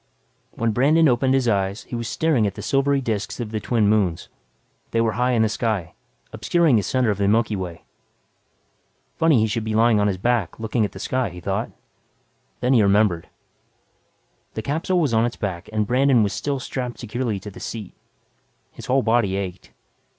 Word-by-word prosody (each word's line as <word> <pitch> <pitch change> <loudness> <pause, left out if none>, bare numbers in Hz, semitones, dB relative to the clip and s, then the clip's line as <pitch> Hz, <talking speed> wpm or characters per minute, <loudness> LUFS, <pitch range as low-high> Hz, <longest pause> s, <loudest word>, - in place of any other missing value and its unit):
When 115 -2 -1
Brandon 150 +8 +4
opened 130 +1 +2
his 130 -2 +1
eyes 100 -1 0
he - - -7
was 115 -1 -3
staring 150 -10 +1
at 100 - -5
the - - -7
silvery 140 0 +1
disks 110 -4 -3
of 115 -3 -4
the 110 - -2
twin 110 0 +1
moons. 100 -6 +1 0.6
They 115 - 0
were 115 -1 +2
high 125 +2 0
in 115 -2 +3
the - - +3
sky, 110 -5 -2 0.4
obscuring 170 -7 +2
the - - +2
center 125 +2 +1
of 100 - -3
the 100 - +2
Milky 110 +1 +2
Way. 90 -4 -6 1.3
Funny 160 -8 +4
he - - +3
should 110 +1 -2
be 110 0 -2
lying 115 -1 +4
on 105 - +2
his 95 -2 -1
back 115 -3 -1
looking 110 0 0
at - - -6
the - - -9
sky, 130 +3 -1
he 90 0 -10
thought. 85 - -2 0.9
Then 125 +2 +2
he 120 - +5
remembered. 100 -4 +2 1.3
The - - -4
capsule 165 +5 0
was 145 -8 +1
on 110 0 +3
its 120 0 -1
back 95 -4 -5
and 110 -1 0
Brandon 125 0 +3
was 100 -1 -1
still 140 +3 -2
strapped 125 -1 -5
securely 115 -2 -3
to 105 +2 -9
the - - -12
seat. 110 -5 -6 0.8
His - - -11
whole 130 +1 +2
body 110 -4 +2
ached. 95 -2 -5
115 Hz, 195 wpm, -22 LUFS, 100-125 Hz, 1.3 s, he